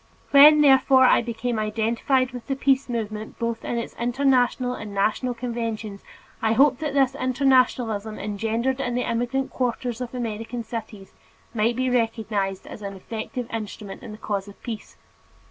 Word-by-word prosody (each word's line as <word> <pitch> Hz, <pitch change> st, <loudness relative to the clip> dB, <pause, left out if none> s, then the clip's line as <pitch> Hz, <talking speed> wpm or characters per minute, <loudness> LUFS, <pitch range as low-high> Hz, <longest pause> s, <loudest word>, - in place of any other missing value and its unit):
When, 295 Hz, +2 st, +9 dB
therefore, 265 Hz, -2 st, +6 dB
I -, -, +5 dB
became 235 Hz, 0 st, -3 dB
identified 230 Hz, +4 st, 0 dB
with 245 Hz, -2 st, -9 dB
the 270 Hz, -, -1 dB
peace 270 Hz, 0 st, +1 dB
movement 215 Hz, -2 st, -4 dB
both 230 Hz, -1 st, -3 dB
in 240 Hz, -, -2 dB
its 235 Hz, -, -4 dB
International 250 Hz, 0 st, +2 dB
and 210 Hz, -4 st, -7 dB
National 220 Hz, +5 st, 0 dB
Conventions, 230 Hz, -4 st, -4 dB, 0.4 s
I 220 Hz, 0 st, +2 dB
hoped 270 Hz, +2 st, +4 dB
that 300 Hz, -3 st, -3 dB
this 270 Hz, -2 st, +3 dB
internationalism 255 Hz, -5 st, +1 dB
engendered 225 Hz, +6 st, -1 dB
in 245 Hz, -2 st, -2 dB
the 250 Hz, -, -1 dB
immigrant 245 Hz, +3 st, -1 dB
quarters 245 Hz, -1 st, -2 dB
of 250 Hz, 0 st, -5 dB
American 230 Hz, 0 st, -4 dB
cities 220 Hz, -3 st, -8 dB, 0.4 s
might 230 Hz, +1 st, +1 dB
be 255 Hz, +1 st, 0 dB
recognized 220 Hz, -5 st, -1 dB
as -, -, -10 dB
an 200 Hz, -1 st, -6 dB
effective 225 Hz, +5 st, -6 dB
instrument 210 Hz, -2 st, -6 dB
in 235 Hz, -4 st, -9 dB
the 210 Hz, -, -9 dB
cause 205 Hz, -2 st, -3 dB
of 200 Hz, -, -13 dB
peace. 225 Hz, -3 st, -7 dB
235 Hz, 160 wpm, -24 LUFS, 215-255 Hz, 0.4 s, When